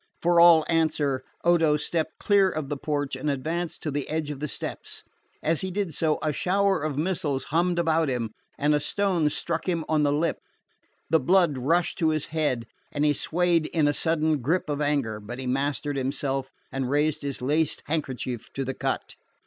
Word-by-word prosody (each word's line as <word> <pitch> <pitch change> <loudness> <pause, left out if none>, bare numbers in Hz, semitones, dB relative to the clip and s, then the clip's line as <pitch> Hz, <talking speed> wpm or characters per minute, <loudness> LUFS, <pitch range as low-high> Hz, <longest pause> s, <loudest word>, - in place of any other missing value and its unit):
For 175 0 +4
all 170 -2 +7
answer, 150 -5 +1 0.2
Odo 165 -3 +4
stepped 160 +1 -2
clear 200 -2 +4
of 155 -5 -4
the 145 - -1
porch 145 -1 -2
and 135 +3 -2
advanced 160 +5 -3
to 150 - -2
the 145 0 -3
edge 155 -1 -2
of 140 - -6
the 150 - -2
steps. - - -5 0.4
As 160 0 +1
he 190 - -2
did 190 -3 -2
so, 155 +1 +1
a 155 -1 +1
shower 195 +3 +1
of 150 -2 -2
missiles 155 -5 -1
hummed 175 +1 +2
about 165 -2 +2
him, 120 -4 -2 0.3
and 150 +1 +2
a 150 - +3
stone 180 -2 +1
struck 165 +4 -2
him 165 -3 -1
on 155 -1 +2
the 145 -1 +3
lip. 155 +3 0 0.7
The 160 - +5
blood 175 -5 +3
rushed 165 +7 +1
to 160 - +3
his 155 -1 0
head, 145 -7 0 0.3
and 145 0 0
he 150 - +4
swayed 170 +1 +1
in 160 -3 +1
the 145 - +3
sudden 155 -1 +1
grip 155 +4 0
of 145 0 -2
anger; 140 -8 0
but 110 +4 -7
he 130 - -5
mastered 140 +2 -1
himself 135 0 -2 0.2
and 135 -1 -2
raised 150 +2 +1
his 140 -2 -3
lace 150 +4 +1
handkerchief 130 -6 -3
to 135 - -2
the 135 - -2
cut. - - -3
150 Hz, 195 wpm, -26 LUFS, 140-165 Hz, 0.7 s, all